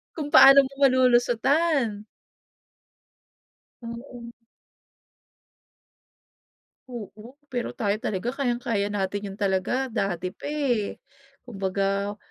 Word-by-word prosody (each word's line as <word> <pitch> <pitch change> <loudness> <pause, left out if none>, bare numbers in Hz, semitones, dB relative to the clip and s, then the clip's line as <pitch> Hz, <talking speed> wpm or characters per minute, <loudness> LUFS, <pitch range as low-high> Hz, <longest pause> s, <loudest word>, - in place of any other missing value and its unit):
Kung 300 -3 -4
paano 275 +1 +9
mo 265 - -9
malulusotan. 250 -1 +2 1.8
Oo. 235 0 -9 2.6
Oo, 235 +1 -10 0.2
pero 245 -2 -4
tayo 210 -1 -1
talaga 215 +4 -3
kayang-kaya 240 -6 -1
natin 200 -1 -2
yun 195 - -9
talaga 205 +6 -1
dati 185 -4 -2
pa, - - -8
eh. 265 -8 -1 0.5
Kumbaga 200 -2 -2
235 Hz, 85 wpm, -25 LUFS, 200-255 Hz, 2.6 s, paano